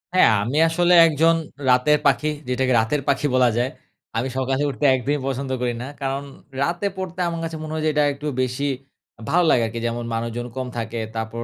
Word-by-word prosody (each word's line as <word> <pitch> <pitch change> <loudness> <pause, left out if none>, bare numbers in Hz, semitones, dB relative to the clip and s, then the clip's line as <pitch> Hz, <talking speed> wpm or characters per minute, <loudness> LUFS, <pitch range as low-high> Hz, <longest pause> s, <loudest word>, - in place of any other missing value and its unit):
হ্যাঁ, 150 - +6
আমি 130 +7 -2
আসলে 175 +2 +2
একজন 165 +2 +3 0.3
রাতের 145 +4 +4
পাখি 140 +2 +3 0.2
যেটাকে 130 0 +1
রাতের 140 +6 0
পাখি 140 +1 +1
বলা 125 -1 +5
যায়। 125 +2 +1 0.5
আমি 125 +3 0
সকালে 135 +2 0
উঠতে 145 +1 -2
একদিনই 140 +3 -1
পছন্দ 135 0 -3
করি 120 -1 0
না। 130 - -5
কারণ 135 +1 -2 0.4
রাতে 175 +6 -1
পড়তে 185 -1 -6
আমার 170 -1 -3
কাছে 165 -1 -4
মনে 155 0 -6
হয় 155 0 -2
যে - - +3
এটা 150 0 +3
একটু 150 +2 -6
বেশি 130 +3 -1 0.6
ভালো 175 +1 +3
লাগে 120 - +4
আরকি। 115 +1 -5
যেমন 120 0 -3
মানুষজন 115 +1 -3
কম 130 -1 -2
থাকে। 115 0 -3 0.2
তারপর 110 +1 -4
135 Hz, 195 wpm, -22 LUFS, 120-155 Hz, 0.6 s, হ্যাঁ